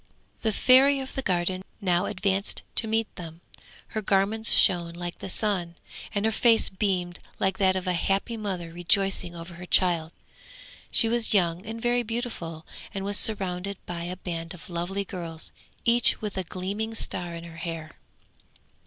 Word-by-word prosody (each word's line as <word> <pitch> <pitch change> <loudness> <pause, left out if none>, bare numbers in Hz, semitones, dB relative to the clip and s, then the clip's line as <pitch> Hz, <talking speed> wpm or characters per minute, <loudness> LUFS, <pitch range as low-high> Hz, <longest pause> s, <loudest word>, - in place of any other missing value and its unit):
The 220 - +2
Fairy 265 +5 +6
of 265 0 -6
the 270 - -2
Garden 185 -3 0 0.2
now 180 -2 +1
advanced 195 0 -1
to 225 - 0
meet 225 0 0
them; 165 -1 -9 0.5
her 220 - -3
garments 205 +3 +3
shone 170 -2 +5
like 175 0 -6
the - - -6
sun, 180 -4 0 0.4
and 200 +1 +1
her 220 - +3
face 225 0 +4
beamed 185 -3 -1 0.2
like 190 0 0
that 190 -1 +4
of 185 0 -2
a 180 - +1
happy 195 +6 0
mother 185 -6 -4
rejoicing 175 0 +1
over 170 +1 -8
her 175 +1 -9
child. 170 -4 +2 0.8
She 225 - +3
was 230 -1 +3
young 175 +1 +1
and 225 +1 -5
very 240 +1 +2
beautiful, 225 -9 -4 0.3
and 195 0 -4
was 205 +1 +2
surrounded 195 -2 0
by 170 -1 -5
a 180 +1 -5
band 165 -2 -5
of 175 - -13
lovely 180 +4 -2
girls, 165 -4 -3 0.3
each 235 +1 +4
with 210 -2 -4
a 190 - -1
gleaming 200 +6 -4
star 175 -5 -2
in 165 - -7
her 170 -1 -10
hair. 165 -2 -5
190 Hz, 170 wpm, -27 LUFS, 175-215 Hz, 0.8 s, Fairy